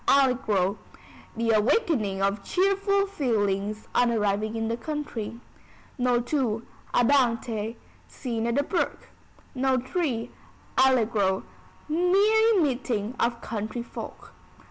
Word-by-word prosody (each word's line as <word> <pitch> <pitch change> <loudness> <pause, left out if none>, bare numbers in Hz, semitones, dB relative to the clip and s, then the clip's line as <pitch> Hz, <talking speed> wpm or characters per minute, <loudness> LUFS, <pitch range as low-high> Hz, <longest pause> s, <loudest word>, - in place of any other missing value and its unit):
Allegro: 230 -8 +3 0.6
The 230 0 +1
awakening 215 - +2
of 200 0 0
cheerful 395 - +2
feelings 215 - -1
on 245 - +3
arriving 215 0 0
in 225 0 -1
the 230 - 0
country. 235 -4 -5 0.6
No. 250 -1 +2
II. 240 -5 0 0.3
Andante: 230 -4 +1 0.3
Scene 230 -3 -3
at 235 - 0
the 285 - +2
Brook. 345 +4 -2 0.4
No. 260 -1 +1
III. 255 -4 -2 0.4
Allegro: 220 -7 +3 0.4
Merry 400 +7 +4
meeting 245 - 0
of 235 0 0
country 220 +2 -4
folk. - - -9
240 Hz, 105 wpm, -26 LUFS, 215-285 Hz, 0.6 s, Merry